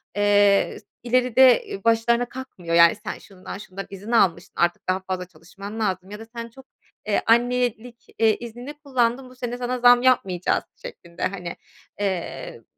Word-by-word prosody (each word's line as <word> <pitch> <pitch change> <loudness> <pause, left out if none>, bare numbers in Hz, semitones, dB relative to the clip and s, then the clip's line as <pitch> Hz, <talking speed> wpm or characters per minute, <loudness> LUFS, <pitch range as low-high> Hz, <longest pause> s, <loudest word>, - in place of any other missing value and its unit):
eee, 205 -1 +3
s - - -26 0.2
ileride, 250 0 +4
eee, 195 - -7
başlarına 235 +1 +2
kakmıyor, 185 -11 -5
yani, 170 +4 +7
"Sen 210 +1 -7
şundan 190 0 -10
şundan 195 -1 -8
izin 200 +4 -8
almıştın, 175 -8 +1
artık 175 +1 0
daha 185 +1 +1
fazla 185 -1 -4
çalışman 195 +6 -10
lazım 190 -2 -2
ya 210 - -7
da 225 - -9
sen 235 0 -6
çok, 265 +3 -16 0.4
eee, 205 - +1
annelik, 240 0 +1
eee, 220 -1 +4
iznini 240 +4 -8
kullandın, 260 -3 -1
bu 255 - -16
sene 245 0 -5
sana 250 0 -3
zam 245 0 +6
yapmayacağız." 190 -9 +1
şeklinde, 180 - -10
hani. 180 -3 -3 0.4
Eee 170 - -4
220 Hz, 160 wpm, -23 LUFS, 190-245 Hz, 0.4 s, yani